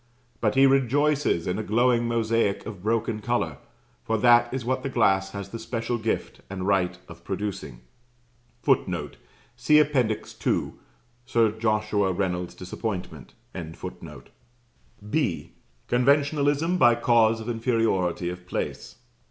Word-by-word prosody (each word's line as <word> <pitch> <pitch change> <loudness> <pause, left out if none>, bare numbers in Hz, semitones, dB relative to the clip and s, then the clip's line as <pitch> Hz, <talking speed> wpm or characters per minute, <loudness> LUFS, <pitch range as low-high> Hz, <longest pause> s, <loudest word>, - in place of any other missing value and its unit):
But 105 -2 0
he 135 +1 +6
rejoices 135 - +2
in 90 +3 -2
a - - -2
glowing 120 +2 +2
mosaic 115 -3 0
of 100 -5 -8
broken 110 +1 -1
colour: 105 - -1 0.4
for 110 - 0
that 120 +1 +5
is 130 -2 -4
what 130 +1 0
the 135 - -3
glass 95 -6 +2
has 100 -1 -6
the 115 - -7
special 115 +1 -3
gift 110 0 -3
and 95 -1 -5
right 90 -3 +1
of 85 0 -13
producing. 95 -10 -5 0.8
[Footnote: - - 0 0.4
See 125 +5 +4
Appendix 135 -8 +1
II., - - 0 0.6
Sir 115 -4 +3
Joshua 105 -3 0
Reynolds's 90 -1 -2
disappointment.] 90 - -6 1.7
(B.) 105 - -1 0.4
Conventionalism 145 +6 +2
by 120 0 +6
cause 115 -2 +3
of 110 - -8
inferiority 115 -7 0
of 90 0 -10
place. - - -4
115 Hz, 125 wpm, -25 LUFS, 95-120 Hz, 1.7 s, he